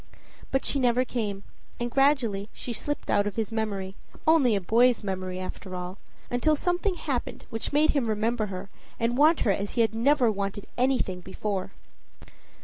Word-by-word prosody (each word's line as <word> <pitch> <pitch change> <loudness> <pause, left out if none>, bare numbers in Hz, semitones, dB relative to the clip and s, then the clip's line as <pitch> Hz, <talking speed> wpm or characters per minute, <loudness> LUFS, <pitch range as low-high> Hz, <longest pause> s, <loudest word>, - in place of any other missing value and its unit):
But 270 - 0
she 280 - +1
never 250 0 +3
came, 205 -6 -3 0.4
and 240 0 -2
gradually 240 -7 +2
she 240 - -5
slipped 290 +6 -3
out 205 0 +3
of 205 - -4
his 225 -1 -2
memory 200 -4 -2 0.3
only 295 -8 +5
a - - +2
boy's 230 +5 +3
memory, 185 -2 -3
after 185 0 -6
all; 180 +1 -6 0.3
until 245 +6 +3
something 355 +4 0
happened 280 -7 -3
which 225 - -3
made 300 +2 +4
him 280 -5 +1
remember 220 +1 0
her, 195 +1 -7 0.3
and 230 +1 +1
want 305 +5 +5
her 210 - +3
as 200 +1 -2
he 235 - +2
had 225 -2 +2
never 245 +1 +3
wanted 200 0 -3
anything 250 -8 +1
before. 190 +1 -4
225 Hz, 170 wpm, -27 LUFS, 200-265 Hz, 0.4 s, only